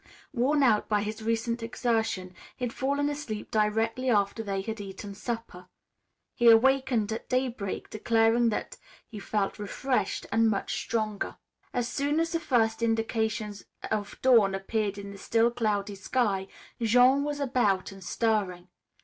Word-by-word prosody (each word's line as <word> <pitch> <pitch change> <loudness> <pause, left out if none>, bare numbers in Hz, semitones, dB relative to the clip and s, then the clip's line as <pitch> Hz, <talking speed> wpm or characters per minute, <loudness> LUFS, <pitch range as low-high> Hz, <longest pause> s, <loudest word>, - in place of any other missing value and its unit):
Worn 280 +3 +2
out 215 -5 +3
by 210 -1 +2
his 215 +1 -5
recent 230 +1 -1
exertion, 225 -6 -1 0.2
he 250 - -2
had 230 - -4
fallen 280 +2 0
asleep 285 -8 -5
directly 225 +4 +1
after 205 -1 +2
they 195 -3 -2
had 220 +1 -5
eaten 200 0 -7
supper. 225 -4 -6 0.7
He 240 -1 +5
awakened 245 -2 +4
at 220 - -5
daybreak 250 -6 -2
declaring 225 +2 +3
that 210 - -4 0.3
he 215 - -8
felt 205 0 -2
refreshed 210 +1 -1
and 225 +1 +4
much 200 -2 -1
stronger. 215 -3 -2 0.3
As 245 -2 -1
soon 285 +5 0
as 330 0 0
the 335 - 0
first 225 -6 +1
indications 225 -2 -1 0.3
of 205 -2 -3
dawn 225 -7 +5
appeared 200 +1 -2
in 200 0 -7
the 200 - -11
still 230 +3 +2
cloudy 210 -3 -1
sky, 195 -1 -1 0.3
Jean 250 +5 +5
was 290 0 -3
about 240 -10 +1
and 195 -1 -11
stirring. 190 -4 -1
225 Hz, 150 wpm, -28 LUFS, 205-245 Hz, 0.7 s, He